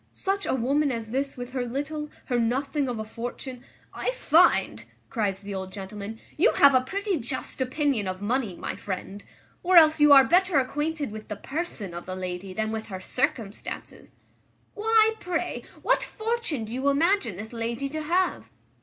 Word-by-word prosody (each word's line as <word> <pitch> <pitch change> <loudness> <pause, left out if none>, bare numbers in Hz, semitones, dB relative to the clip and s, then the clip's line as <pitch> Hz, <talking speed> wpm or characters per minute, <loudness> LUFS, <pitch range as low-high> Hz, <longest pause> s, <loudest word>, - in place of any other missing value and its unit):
Such 390 0 -2
a - - +1
woman 275 +4 +1
as 225 -2 -4
this 275 +2 -2
with 245 0 -6
her 255 -2 -1
little, 290 +5 -4 0.2
her 245 -2 0
nothing 270 +4 0
of 240 - -3
a 220 - -3
fortune" 245 +3 -7 0.3
"I - - -2
find," - - +3 0.3
cries 200 -4 -1
the 200 0 -6
old 190 -1 -5
gentleman, 205 +2 -7 0.2
"you 400 +11 +4
have 280 -1 +7
a 255 - +5
pretty 390 +8 -2
just 260 +2 -4
opinion 260 -5 0
of 185 0 -3
money, 220 -1 -1
my - - -4
friend, 195 +1 -6 0.4
or 360 0 +4
else 315 -1 +7
you 295 0 +7
are 275 -1 +10
better 360 +3 +3
acquainted 295 +1 -1
with 215 0 -8
the 210 - -4
person 270 - -5
of 175 0 -7
the 185 - -4
lady 185 +1 -5
than 220 +3 -2
with 220 0 -4
her 190 -3 -6
circumstances. 240 -1 -3 0.6
Why, 445 +1 +4
pray, 355 0 -2 0.2
what - - +3
fortune 440 - -2
do 220 - -8
you 265 +3 +1
imagine 285 - +2
this 220 +5 -8
lady 235 +3 -2
to 310 +2 -4
have?" 355 +4 0
260 Hz, 180 wpm, -26 LUFS, 220-310 Hz, 0.6 s, are